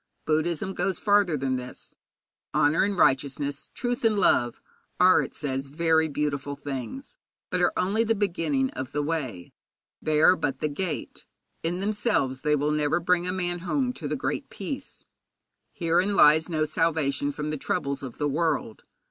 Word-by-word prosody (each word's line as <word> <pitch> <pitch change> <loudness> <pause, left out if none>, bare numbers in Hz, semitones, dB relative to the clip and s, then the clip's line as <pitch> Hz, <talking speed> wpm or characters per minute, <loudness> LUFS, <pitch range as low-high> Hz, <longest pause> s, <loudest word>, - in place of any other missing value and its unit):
Buddhism 160 +4 0
goes 185 -1 -1
farther 200 -6 +3
than 130 -1 -1
this. 125 0 -9 0.6
Honour 145 +5 +4
and 200 -1 -1
righteousness, 140 0 +1
truth 245 -1 -2
and 220 -2 +3
love, 120 -10 +2 0.4
are, 185 +1 +6
it - - -6
says, 135 -2 -3
very 160 +2 +2
beautiful 145 -1 -2
things, 145 - -6 0.3
but - - 0
are - - +4
only 200 +5 +2
the 225 0 +1
beginning 165 -9 0
of 130 -2 -6
the 145 0 0
way; 135 - -4 0.5
they 155 -1 +1
are 180 +4 +7
but 145 -6 -2
the 155 - 0
gate. 165 +3 -4 0.3
In 175 +3 -2
themselves 205 - 0
they 150 +1 +2
will 150 +1 0
never 150 +2 +1
bring 180 +1 +1
a - - 0
man 175 -1 -2
home 250 +8 -1
to - - -6
the - - -1
Great - - -3
Peace. 280 -2 -7 0.7
Herein 180 +4 +1
lies 155 0 +6
no 155 -2 +1
salvation 150 -3 0
from 150 +1 -4
the - - -1
troubles 140 -5 -2
of 130 -4 -8
the 145 - 0
world. 145 -6 -1
155 Hz, 165 wpm, -26 LUFS, 140-185 Hz, 0.7 s, are